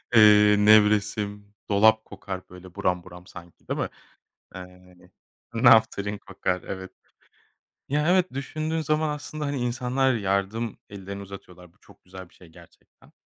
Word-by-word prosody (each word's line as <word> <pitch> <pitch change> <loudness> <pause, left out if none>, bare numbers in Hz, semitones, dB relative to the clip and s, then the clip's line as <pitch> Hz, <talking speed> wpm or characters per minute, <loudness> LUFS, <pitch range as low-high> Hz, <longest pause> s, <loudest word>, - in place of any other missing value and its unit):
eee, 105 -1 +7
nevresim, 105 -1 +2 0.2
dolap 110 +2 +4
kokar, 95 -2 -8
böyle, 90 0 -14
buram 90 -1 -1
buram 90 0 -14
sanki, 85 -1 -14
değil - - -3
mi? - - -2 0.7
Eee, 90 0 -12 0.6
naftalin 110 -3 +3
kokar, 95 -2 -3
evet. 95 -1 -7 1.0
Ya 150 +3 0
evet, 185 0 +2
düşündüğün 155 +4 -3
zaman 155 0 0
aslında, 150 0 -5
hani, 140 -1 -3
insanlar 125 +2 0
yardım 100 +2 -2
ellerini 100 0 -8
uzatıyorlar. 90 -3 -13
Bu - - -35
çok - - -21
güzel 95 0 -11
bir - - -27
şey 90 - -17
gerçekten. 80 - -21
105 Hz, 135 wpm, -25 LUFS, 95-120 Hz, 1.0 s, eee